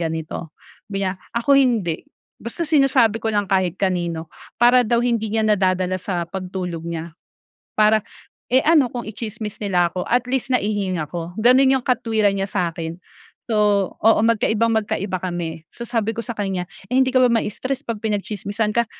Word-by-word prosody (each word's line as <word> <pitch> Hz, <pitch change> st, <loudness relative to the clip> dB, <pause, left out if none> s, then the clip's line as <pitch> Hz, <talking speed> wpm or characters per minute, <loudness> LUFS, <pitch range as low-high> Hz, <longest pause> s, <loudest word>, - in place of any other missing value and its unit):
ganito 160 Hz, -1 st, -4 dB, 0.4 s
sabi 195 Hz, -1 st, -2 dB
niya, 185 Hz, -, -1 dB, 0.2 s
"Ako 240 Hz, +4 st, +2 dB
hindi, 220 Hz, -11 st, +1 dB, 0.4 s
basta 235 Hz, +9 st, -4 dB
sinasabi 270 Hz, -7 st, +4 dB
ko 225 Hz, -, 0 dB
lang 205 Hz, -1 st, +1 dB
kahit 185 Hz, -2 st, +1 dB
kanino." 175 Hz, -4 st, -1 dB, 0.3 s
Para 245 Hz, +1 st, +6 dB
daw 235 Hz, +2 st, +2 dB
hindi 230 Hz, -3 st, 0 dB
niya 220 Hz, -, +2 dB
nadadala 185 Hz, -3 st, +2 dB
sa 180 Hz, -2 st, -2 dB
pagtulog 180 Hz, -2 st, -5 dB
niya 165 Hz, -1 st, -5 dB, 0.7 s
para 215 Hz, 0 st, +5 dB, 0.5 s
eh, 260 Hz, -, +6 dB
ano 305 Hz, -4 st, +5 dB
kung 245 Hz, -, -3 dB
i-tsismis 215 Hz, -1 st, -6 dB
nila 180 Hz, -4 st, +1 dB
ako 180 Hz, -, -4 dB
at 245 Hz, +1 st, +2 dB
least 265 Hz, -2 st, 0 dB
naihinga 195 Hz, -9 st, -1 dB
ko. 170 Hz, 0 st, -5 dB
Gano'n 260 Hz, +3 st, +6 dB
yung -, -, -15 dB
katuwiran 220 Hz, -5 st, +1 dB
niya 195 Hz, -, 0 dB
sa'kin. 170 Hz, -2 st, -3 dB, 0.5 s
So, 220 Hz, -, +1 dB, 0.4 s
oo 225 Hz, 0 st, +4 dB
magkaibang-magkaiba 220 Hz, -3 st, +1 dB
kami. 170 Hz, -3 st, -4 dB
So 235 Hz, -, -7 dB
sabi 225 Hz, -2 st, 0 dB
ko 230 Hz, -, -3 dB
sa 235 Hz, -3 st, -6 dB
kanya, 190 Hz, -3 st, -2 dB, 0.2 s
"eh, 250 Hz, -, -1 dB
hindi 260 Hz, 0 st, +4 dB
ka 255 Hz, -, +3 dB
ba -, -, +6 dB
mai-stress 245 Hz, +4 st, -2 dB
'pag 230 Hz, -3 st, -3 dB
pinagtsismisan 210 Hz, 0 st, -2 dB
ka?" 235 Hz, 0 st, +3 dB
210 Hz, 165 wpm, -21 LUFS, 180-235 Hz, 0.7 s, Para